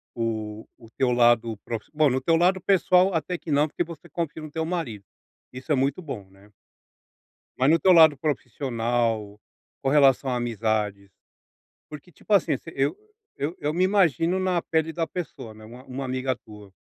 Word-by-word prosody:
o 110 -2 -3
o 115 - -16
teu 125 +2 0
lado 120 -2 +3
prof 115 -2 -5
bom, 150 -1 +3
no 130 0 0
teu 165 - +2
lado 180 +3 +3
pessoal 185 0 +3
até 165 +2 -2
que 165 - -7
não 145 +1 +3
porque 175 - -2
você 170 0 -11
confia 160 -1 -4
no 155 - -8
teu 160 +1 -2
marido, 150 - -4 0.5
isso 130 +5 -7
é - - +5
muito 135 +5 0
bom, 120 - -7
né. 100 +2 -21 1.1
Mas 130 +3 +4
no 165 - +4
teu 190 - +5
lado 160 -4 +7
profissional, 120 -6 -2 0.5
com - - 0
relação 135 -2 +4
a 125 - 0
amizades, 110 -4 -2 0.8
porque 150 +4 -11
tipo 175 - -13
assim, 195 - +3
você 165 - -12
eu 140 +2 0 0.4
eu 150 +5 -3
eu 150 +1 -1
me 180 +3 +1
imagino 180 - +2
na 185 -2 0
pele 160 0 -1
da 165 -1 -2
pessoa, 160 -10 -7
né, 110 0 -13
uma 120 +3 -12
uma 135 +1 -5
amiga 130 0 -1
tua. 105 -3 -15
135 Hz, 180 wpm, -25 LUFS, 115-165 Hz, 1.1 s, lado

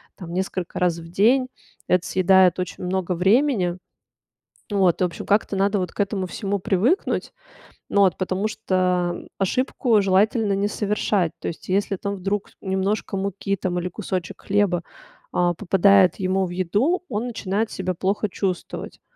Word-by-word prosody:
там, 175 -3 -9
несколько 185 0 -3
раз 175 -2 +1
в 165 - -10
день. 240 +9 +3 0.4
Это 180 -1 +2
съедает 185 -1 +4
очень 180 0 -4
много 180 0 -1
времени. 190 0 +2 0.9
Вот, 190 -4 +2
в - - +5
общем, 175 - -4
как-то 205 0 +2
надо 200 +1 +2
вот 180 -2 -3
к - - -8
этому 200 -1 0
всему 200 +2 -3
привыкнуть. 205 - 0 0.6
Ну 200 - +2
вот, 190 -2 +4
потому 190 +2 -1
что 185 -5 0
ошибку 230 +2 +1
желательно 200 +3 +2
не 200 +1 0
совершать. 205 -4 0
То - - -3
есть, 165 - -9
если 195 +1 0
там 200 +2 -3
вдруг 195 +2 -3
немножко 195 +1 -1
муки 195 +1 -2
там 180 -1 -2
или 180 - -3
кусочек 185 -2 -5
хлеба, 195 -4 +1 0.5
а, 175 0 +2
попадает 195 0 +4
ему 190 +1 +1
в 175 - -6
еду, 205 - 0
он 230 +1 -2
начинает 215 -1 -2
себя 185 -1 -2
плохо 195 +4 -1
чувствовать. 185 -2 -4
190 Hz, 155 wpm, -23 LUFS, 180-205 Hz, 0.9 s, в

